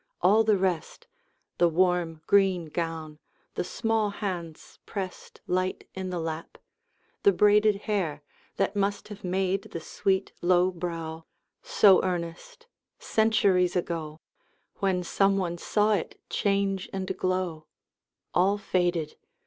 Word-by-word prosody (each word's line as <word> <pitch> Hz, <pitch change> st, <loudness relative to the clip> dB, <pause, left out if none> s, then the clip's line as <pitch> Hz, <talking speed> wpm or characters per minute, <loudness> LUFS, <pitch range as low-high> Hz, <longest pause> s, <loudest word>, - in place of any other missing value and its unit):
All 205 Hz, +5 st, +5 dB
the 215 Hz, -2 st, +3 dB
rest 185 Hz, -, -2 dB, 0.5 s
The 175 Hz, -, +5 dB
warm 170 Hz, -2 st, +1 dB
green 190 Hz, -4 st, +3 dB
gown, 160 Hz, -2 st, -4 dB, 0.3 s
the -, -, -2 dB
small 225 Hz, +2 st, 0 dB
hands 180 Hz, -6 st, -6 dB
pressed 190 Hz, -3 st, -6 dB
Light 185 Hz, +1 st, -1 dB
in 190 Hz, -1 st, -4 dB
the 180 Hz, -, -3 dB
lap, 160 Hz, 0 st, -5 dB, 0.6 s
the 200 Hz, -, +6 dB
braided 210 Hz, +1 st, +4 dB
hair 180 Hz, -9 st, -1 dB, 0.3 s
That -, -, 0 dB
must 200 Hz, 0 st, -1 dB
have 210 Hz, -1 st, -10 dB
made 190 Hz, +1 st, 0 dB
the 165 Hz, -, -5 dB
sweet 190 Hz, +4 st, -1 dB
low 180 Hz, +1 st, +3 dB
brow 165 Hz, -2 st, -5 dB, 0.4 s
So 195 Hz, -3 st, +5 dB
earnest, 175 Hz, -, -4 dB, 0.3 s
centuries 200 Hz, -5 st, +2 dB
ago, 165 Hz, -3 st, -3 dB, 0.6 s
When 190 Hz, -2 st, 0 dB
some 195 Hz, +3 st, +2 dB
one 175 Hz, -3 st, -2 dB
saw 210 Hz, +3 st, +2 dB
it 195 Hz, -, -3 dB
change 195 Hz, -1 st, 0 dB
and 190 Hz, -1 st, -3 dB
glow 185 Hz, -4 st, -2 dB, 0.7 s
All 195 Hz, +3 st, +3 dB
faded! 175 Hz, -5 st, -1 dB
185 Hz, 125 wpm, -27 LUFS, 170-200 Hz, 0.7 s, the